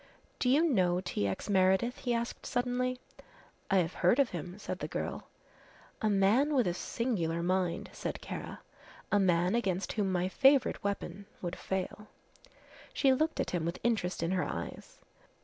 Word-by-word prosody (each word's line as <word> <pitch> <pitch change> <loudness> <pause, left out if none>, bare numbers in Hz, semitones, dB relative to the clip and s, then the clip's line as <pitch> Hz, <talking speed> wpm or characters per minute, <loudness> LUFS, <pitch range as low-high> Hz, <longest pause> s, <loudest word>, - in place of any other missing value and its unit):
"Do 250 - +2
you 285 +5 +5
know 180 - +2
T. 105 - -2
X. 95 - -4
Meredith?" 190 +4 +3
he 245 - -2
asked 235 +1 -3
suddenly. 250 0 -1 0.7
"I 195 - +4
have 175 -1 +1
heard 180 +7 +3
of 275 -4 +3
him," 180 +2 -6
said 210 - -5
the - - -3
girl. - - -4 0.7
"A 220 - +2
man 215 +10 +3
with 250 -4 +4
a 175 - +1
singular 170 -6 -1
mind," 180 -1 0
said - - -4
Kara; - - -7 0.5
"a 205 - +4
man 180 -1 +3
against 195 -5 0
whom 200 -3 0
my 180 0 +1
favourite 270 +6 +3
weapon 200 -1 -3 0.2
would 175 0 -3
fail." 190 +2 -4 0.9
She 275 - +4
looked 315 +4 0
at - - -1
him 175 -3 -1
with 170 +2 -2
interest 200 -7 0
in 165 - 0
her 185 -1 +1
eyes. - - -6
195 Hz, 165 wpm, -31 LUFS, 180-245 Hz, 0.9 s, you